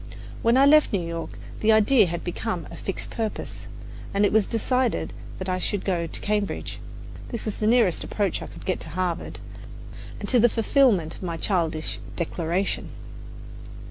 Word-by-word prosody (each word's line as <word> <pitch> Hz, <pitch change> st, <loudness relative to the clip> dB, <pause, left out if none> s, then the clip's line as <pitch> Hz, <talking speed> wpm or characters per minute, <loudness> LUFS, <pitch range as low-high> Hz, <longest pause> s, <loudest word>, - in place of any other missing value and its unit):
When 230 Hz, +2 st, +4 dB
I 270 Hz, -, +7 dB
left 305 Hz, +1 st, +6 dB
New 185 Hz, -4 st, 0 dB
York 165 Hz, 0 st, -5 dB, 0.2 s
the 220 Hz, -, +4 dB
idea 220 Hz, 0 st, +5 dB
had 170 Hz, 0 st, -4 dB
become 180 Hz, -1 st, -3 dB
a -, -, -8 dB
fixed 195 Hz, -, -5 dB
purpose; 220 Hz, -2 st, -4 dB, 0.5 s
and 200 Hz, +1 st, +4 dB
it -, -, +1 dB
was 215 Hz, -2 st, +4 dB
decided 250 Hz, +1 st, 0 dB, 0.2 s
that 185 Hz, -, -5 dB
I 185 Hz, 0 st, 0 dB
should 200 Hz, +1 st, -2 dB
go 175 Hz, -3 st, 0 dB
to -, -, -4 dB
Cambridge. 210 Hz, -1 st, -2 dB, 0.5 s
This 235 Hz, -, -5 dB
was 215 Hz, -, -3 dB
the 215 Hz, -, 0 dB
nearest 225 Hz, -6 st, +3 dB
approach 200 Hz, -4 st, -1 dB
I -, -, -6 dB
could -, -, -12 dB
get 185 Hz, -, 0 dB
to -, -, -6 dB
Harvard 175 Hz, +1 st, -2 dB, 0.8 s
and -, -, -5 dB
to 250 Hz, -, +4 dB
the 240 Hz, +2 st, +6 dB
fulfillment 225 Hz, -, +3 dB
of -, -, -11 dB
my 170 Hz, -3 st, -3 dB
childish 165 Hz, -4 st, 0 dB, 0.2 s
declaration. 170 Hz, +2 st, -1 dB
200 Hz, 175 wpm, -25 LUFS, 175-225 Hz, 0.8 s, I